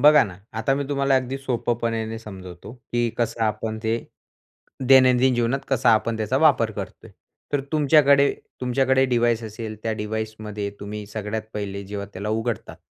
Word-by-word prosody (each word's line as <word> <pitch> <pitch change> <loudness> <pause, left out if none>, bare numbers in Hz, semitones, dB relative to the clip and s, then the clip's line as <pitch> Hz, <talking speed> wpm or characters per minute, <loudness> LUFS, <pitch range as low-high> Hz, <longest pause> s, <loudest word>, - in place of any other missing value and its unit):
बघा 150 0 +8
ना, 90 -3 -9
आता 110 +5 0
मी 140 +1 -2
तुम्हाला 140 -1 +2
अगदी 130 +1 -1
सोप्यापणाने 115 -3 -2
समजवतो, 95 -3 -10
की 120 -1 -2
कसं 115 -1 -1
आपण 110 +1 -2
ते 110 0 +1 0.9
दैनंदिन 130 -1 +6
जीवनात 120 +3 +1
कसा 130 -2 +3
आपण 115 +1 0
त्याचा 110 +4 0
वापर 140 -7 +4
करतोय. - - -8 0.4
तर 145 - +2
तुमच्याकडे 145 -2 +5 0.3
तुमच्याकडे 130 +1 +2
डिवाईस 120 -2 +2
असेल, 110 0 -6
त्या 110 - -1
डिवाइसमध्ये 105 -1 -4
तुम्ही 105 +1 -6
सगळ्यात 105 +1 -4
पहिले 100 -1 -4
जेव्हा 100 0 -5
त्याला 100 +3 -5
उघडतात. 115 +2 -2
115 Hz, 150 wpm, -23 LUFS, 110-130 Hz, 0.9 s, बघा